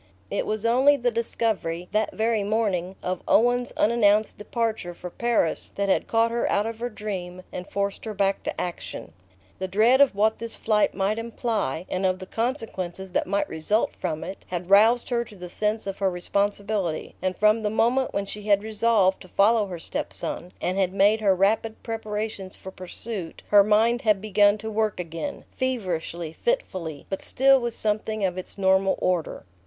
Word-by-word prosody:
It - - -1
was 215 +1 -2
only 265 +5 +5
the 245 -2 0
discovery 215 -7 -1
that 215 +1 +1
very 220 -1 +1
morning 200 -4 0
of 185 -1 -2
Owen's 245 +2 +3
unannounced 215 -1 +3
departure 215 -5 -2
for 180 0 -8
Paris 235 -8 0
that 200 0 -1
had - - +2
caught 230 0 +2
her 235 - 0
out 205 - +2
of 225 0 -5
her 240 +1 -2
dream 185 -5 -6
and 180 +1 -7
forced 200 +1 -2
her 215 -1 -5
back 195 0 +1
to - - -4
action. 175 - -5 0.5
The 190 - -2
dread 225 +8 +4
of 280 -7 +5
what 215 +2 +2
this 230 0 -4
flight 215 -1 +1
might 200 +3 0
imply, 220 - -2
and 185 +1 -2
of 185 -1 +2
the 185 - -8
consequences 190 -6 -3
that - - 0
might 200 +2 0
result 160 +8 0
from 160 -4 -3
it, 190 +2 -7
had 180 +1 -5
roused 225 +4 +5
her 240 -1 +1
to 215 - -14
the 180 -2 -9
sense 215 +2 -1
of 195 -1 -5
her 195 -1 +2
responsibility, 200 -1 -1
and 185 0 -1
from 215 +2 +4
the 210 - 0
moment 240 +4 +2
when 200 - -2
she 210 +1 -7
had 200 -1 +4
resolved 215 -3 +2
to - - -11
follow 210 +3 +3
her 180 -2 -6
step 165 - -4
son, 180 - -4
and 185 +2 -1
had 185 -1 +1
made 205 +3 +4
her 195 -3 +4
rapid 215 +4 +1
preparations 215 -4 -4
for 190 - -10
pursuit, 185 0 -7
her 205 -1 +7
mind 220 +3 +3
had 215 -3 +3
begun 205 0 +3
to 220 +1 -6
work 215 -2 0
again, 170 - -5
feverishly, 175 -10 -3
fitfully, 185 - -2
but 195 - -4
still 270 0 +4
with 235 -1 -2
something 215 -1 0
of 180 -2 -1
its 185 +2 -4
normal 190 0 +3
order. 180 -3 -1
205 Hz, 185 wpm, -25 LUFS, 185-225 Hz, 0.5 s, her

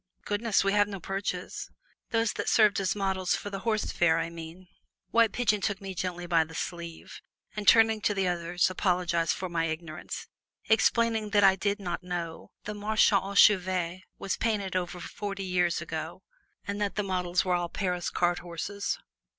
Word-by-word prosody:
"Goodness! 210 0 +1
we 195 - +2
have 205 0 +4
no 200 -2 -6
Perches." 195 -1 -4 0.4
"Those 225 -1 +1
that - - -2
served 210 -3 +4
as 190 -1 0
models 190 -2 0
for 205 - -6
the 195 - -4
'Horse 215 0 -1
Fair,' 165 -2 +3
I 165 0 -2
mean." 170 +2 -10 0.4
White 230 -2 +4
Pigeon 210 -4 +1
took 200 -1 -1
me 195 -2 -6
gently 175 -1 -3
by 170 -2 +3
the 160 0 -12
sleeve, 170 -1 -6 0.3
and 210 -1 -5
turning 225 -1 +6
to 205 - +1
the 195 -1 +1
others 175 +1 0
apologized 175 -3 +1
for 185 - -4
my 170 -2 -1
ignorance, 160 -1 -5 0.4
explaining 220 0 +2
that 205 -1 +3
I 190 -1 +7
did 200 +2 -1
not 175 -3 -3
know 175 -2 -5
the 210 +1 -5
"Marche 215 +1 +2
aux 195 0 +1
Chevaux" 185 -3 +4 0.2
was 195 - -2
painted 205 -5 -1
over 180 -1 -2
forty 200 +2 -5
years 180 -2 +1
ago, 160 +3 -6 0.4
and 200 +1 -3
that 205 -1 -1
the 210 - 0
models 180 -2 0
were 180 - +1
all 175 -1 0
Paris 180 -2 -2
cart 175 0 +1
horses. 180 +4 -4
185 Hz, 180 wpm, -28 LUFS, 175-205 Hz, 0.4 s, I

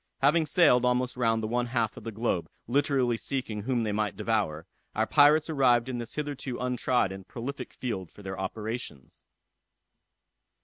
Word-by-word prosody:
Having 155 +3 +4
sailed 145 -6 +5
almost 125 0 +1
round 115 -2 +1
the - - -1
one 120 +2 0
half 115 -3 0
of - - -10
the 115 - -5
globe, 110 -5 -1 0.2
literally 130 -2 +1
seeking 115 -5 -3
whom 120 +1 0
they 110 - -1
might 105 -2 -1
devour, 105 -8 -1 0.3
our 110 - +2
pirates 150 +4 +5
arrived 130 -6 +3
in 125 -2 -3
this 120 - -6
hitherto 145 -4 -4
untried 125 -3 +1
and 95 -1 -9
prolific 130 +4 -6
field 95 -9 -4
for 105 - -15
their 95 -1 -5
operations. 105 - -5
120 Hz, 165 wpm, -28 LUFS, 110-130 Hz, 0.3 s, sailed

